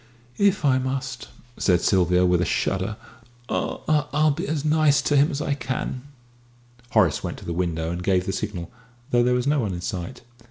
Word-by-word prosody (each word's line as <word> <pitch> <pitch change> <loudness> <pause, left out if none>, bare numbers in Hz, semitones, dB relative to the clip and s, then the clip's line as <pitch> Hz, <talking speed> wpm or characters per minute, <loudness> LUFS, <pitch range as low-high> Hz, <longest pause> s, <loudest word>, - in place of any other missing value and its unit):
"If 200 -5 +3
I 130 -2 +4
must," 130 -1 -4 0.3
said 90 -3 +3
Sylvia, 90 -2 +3
with 90 -1 +3
a - - +2
shudder, 95 +3 -1 0.5
"I 150 -2 0
I'll 150 +1 +3
be 170 +7 -3
as 155 -1 -2
nice 155 -2 +4
to 145 - +1
him 145 +3 +5
as 145 -3 -3
I 145 - 0
can." 130 -2 -3 0.9
Horace - - +2
went - - -4
to - - -11
the 85 - -3
window 85 -2 -1
and 85 +1 -4
gave 90 -1 +1
the 95 - -2
signal, 95 -6 -4 0.4
though 120 - +4
there 125 +1 +3
was 125 0 0
no 145 +1 +2
one 105 -7 -1
in 85 - -5
sight. 90 +5 -5
125 Hz, 195 wpm, -24 LUFS, 90-145 Hz, 0.9 s, him